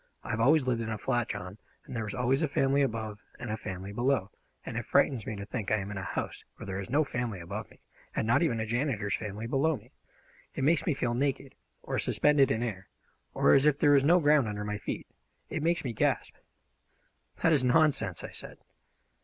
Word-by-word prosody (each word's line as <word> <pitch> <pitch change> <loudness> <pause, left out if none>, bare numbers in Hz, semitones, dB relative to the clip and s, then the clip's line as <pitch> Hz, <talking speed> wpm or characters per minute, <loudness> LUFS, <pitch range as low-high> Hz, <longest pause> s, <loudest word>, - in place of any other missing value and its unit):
"I - - -2
always 135 +6 +4
lived 120 -2 0
in 110 - -3
a 110 - -2
flat, 120 +3 -1
John, 95 +3 -6 0.3
and - - -8
there 115 - -1
was 105 - -5
always 130 +3 +1
a 160 - +2
family 135 0 +2
above 110 -5 -2 0.2
and 120 - -5
a - - 0
family 95 -2 -6
below, 120 -4 +1 0.3
and - - -6
it - - -3
frightens 125 -7 +2
me 110 - -3
to 100 0 -6
think 110 -2 -4
I 110 - +3
am 100 0 -4
in 100 - -4
a - - -4
house - - -4
where - - -9
there 95 -1 -4
is 100 - -6
no 145 +5 +3
family 120 -7 -3
above 100 +5 -6
me, - - -21 0.3
and - - 0
not 115 +8 +3
even 125 -9 +1
a 110 - -1
janitor's 115 -3 0
family 105 0 -5
below 140 +5 +1
me. 105 - -19 0.6
It - - -2
makes 160 +4 +2
me 155 - +2
feel 120 -3 -1
naked, 135 +1 -1 0.3
or - - -2
suspended 145 -3 +3
in 110 +2 0
air, 100 -5 -4 0.5
or - - +5
as 140 +2 +5
if 145 -2 +4
there 145 0 +4
was 140 -1 +5
no 175 +5 +5
ground 150 -5 +4
under 105 0 -4
my 105 0 -3
feet. - - -4 0.5
It 160 - -2
makes 170 +2 +1
me 120 - -2
gasp!" - - 0 1.1
"That 165 - +5
is 140 -4 +3
nonsense!" 135 - +2
I - - -6
said. - - -9
120 Hz, 225 wpm, -29 LUFS, 105-140 Hz, 1.1 s, or